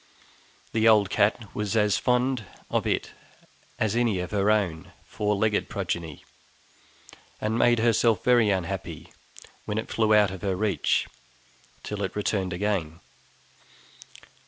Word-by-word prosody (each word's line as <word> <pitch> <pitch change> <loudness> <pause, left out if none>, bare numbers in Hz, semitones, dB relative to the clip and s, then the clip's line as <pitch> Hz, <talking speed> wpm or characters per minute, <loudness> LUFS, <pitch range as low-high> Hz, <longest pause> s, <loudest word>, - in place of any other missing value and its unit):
The 110 0 +2
old 105 -3 +5
cat 105 +1 +1
was 105 +1 -2
as 105 -2 +2
fond 125 -1 +1 0.3
of - - 0
it - - -1 0.7
as 110 0 0
any 120 -5 +1
of 90 0 -4
her 100 0 +1
own 95 -7 0
four 105 0 -1
legged 105 +1 0
progeny, 85 -7 -4 1.1
and 110 +1 -1
made 120 0 +4
herself 115 -2 +2
very 120 -4 +4
unhappy 95 -4 -4 0.5
when 105 - -3
it 110 - -4
flew 110 -1 +1
out 105 -2 +4
of 95 -2 -8
her 95 -2 -1
reach 100 -4 0 0.8
till 105 -1 -5
it 95 -2 -3
returned 100 -2 -1
again. 90 -4 -2
105 Hz, 135 wpm, -26 LUFS, 95-110 Hz, 1.1 s, old